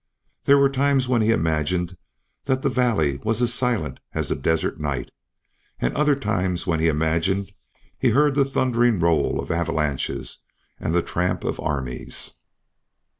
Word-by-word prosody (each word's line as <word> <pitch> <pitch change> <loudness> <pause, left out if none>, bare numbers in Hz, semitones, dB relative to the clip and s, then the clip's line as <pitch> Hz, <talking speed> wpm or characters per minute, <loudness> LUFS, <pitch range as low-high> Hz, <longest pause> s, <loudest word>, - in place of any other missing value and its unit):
There 140 - +6
were 140 0 +5
times 135 -1 +1
when 125 -3 +2
he 110 - +2
imagined 85 -1 0 0.5
the 130 - +2
valley 125 - +1
was 110 +1 0
as 120 -1 +1
silent 110 - -1 0.2
as - - -1
the - - 0
desert 80 -1 0
night, 75 -3 -3 0.7
and - - -1
other 150 -1 +3
times 95 -7 -1
when 80 -3 0
he 80 - +2
imagined 80 +5 0 0.5
he 130 - +3
heard 145 +5 +3
the 140 0 +3
thundering 120 -5 +2
roll 80 -4 +2
of - - -4
avalanches 75 -6 -2 0.4
and 80 - -1
the 85 - +3
tramp 90 +1 -1
of - - -2
armies. 65 -4 -3
90 Hz, 150 wpm, -23 LUFS, 80-125 Hz, 0.7 s, There